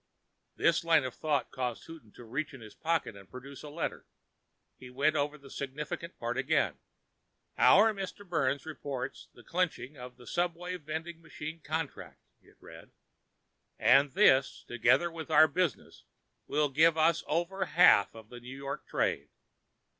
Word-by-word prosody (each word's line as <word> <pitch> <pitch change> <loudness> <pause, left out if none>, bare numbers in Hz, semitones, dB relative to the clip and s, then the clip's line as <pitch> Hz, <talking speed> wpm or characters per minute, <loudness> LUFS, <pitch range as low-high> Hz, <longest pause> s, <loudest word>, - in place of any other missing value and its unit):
This 170 -1 +2
line 165 -3 +4
of 130 -2 -4
thought 150 -2 -1
caused 125 -3 -4
Houghton 160 -10 -12
to - - -12
reach 140 +5 -4
in 130 - -12
his 110 -2 -11
pocket 165 -8 -1
and 100 -1 -14
produce 135 +2 -10
a 150 - -9
letter. 155 +3 -4 0.7
He 125 - -12
went 140 +5 +1
over 145 +1 -1
the 140 -2 -15
significant 150 +5 -6
part - - -3
again. - - +1 0.8
"Our 220 +1 +6
Mr. 200 0 -7
Byrnes 140 -5 0
reports 145 -4 -6
the 120 - -15
clinching 165 -5 -2
of 125 0 -10
the 125 - -15
subway 175 +2 -2
vending 160 +1 -6
machine 160 0 -8
contract," 160 0 -5 0.2
it - - -24
read, - - -13 0.9
"and 135 +2 +4
this, 135 -9 +4
together 125 +8 +2
with 165 -1 -8
our 155 0 +7
other 155 - +2
business, 180 -5 -2 0.4
will 150 0 +1
give 160 +4 +4
us 160 0 +3
over 175 +4 -1
half 165 - +5
of 110 -1 -12
the 120 - -10
New 125 +2 -10
York 140 0 -6
trade. 70 +1 -1
150 Hz, 160 wpm, -30 LUFS, 130-165 Hz, 0.9 s, our